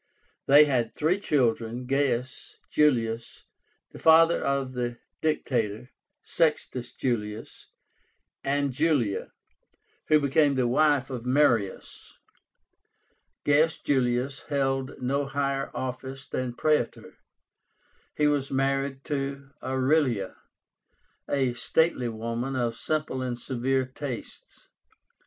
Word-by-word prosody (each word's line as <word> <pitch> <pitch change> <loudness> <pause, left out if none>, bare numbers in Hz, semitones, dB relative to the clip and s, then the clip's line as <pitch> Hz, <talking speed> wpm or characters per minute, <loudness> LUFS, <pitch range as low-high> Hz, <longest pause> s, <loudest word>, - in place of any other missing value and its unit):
They 145 +2 +8
had 125 -5 0
three 165 +6 0
children, 120 - 0
Gaius 130 -1 -1 0.2
Julius, 115 -6 +1 0.5
the - - -11
father 165 +1 +5
of 135 -2 -1
the 120 -1 -3 0.2
Dictator, 125 -6 -1 0.3
Sextus 140 -6 -1
Julius, 110 -3 -4 0.8
and 140 0 0
Julia, 140 -8 0 0.8
who 155 - +5
became 140 0 +3
the 130 -2 +1
wife 140 +1 +2
of 125 -1 -5
Marius. 125 -8 0 1.3
Gaius 150 +2 +3
Julius 130 0 0
held 135 -1 -1
no 135 +2 -1
higher 140 0 -1
office 130 +1 -5
than 125 -2 -3
Praetor. 150 -5 -1 1.0
He 150 - +3
was 145 -2 +1
married 135 0 -1
to 140 -2 -4
Aurelia, 130 -5 +1 0.9
a 135 -3 +1
stately 130 -1 +1
woman 115 +4 -3
of 120 -2 -1
simple 150 -1 -2
and 125 -2 -3
severe 130 +1 -1
tastes. 130 -1 -8
135 Hz, 100 wpm, -27 LUFS, 120-145 Hz, 1.3 s, They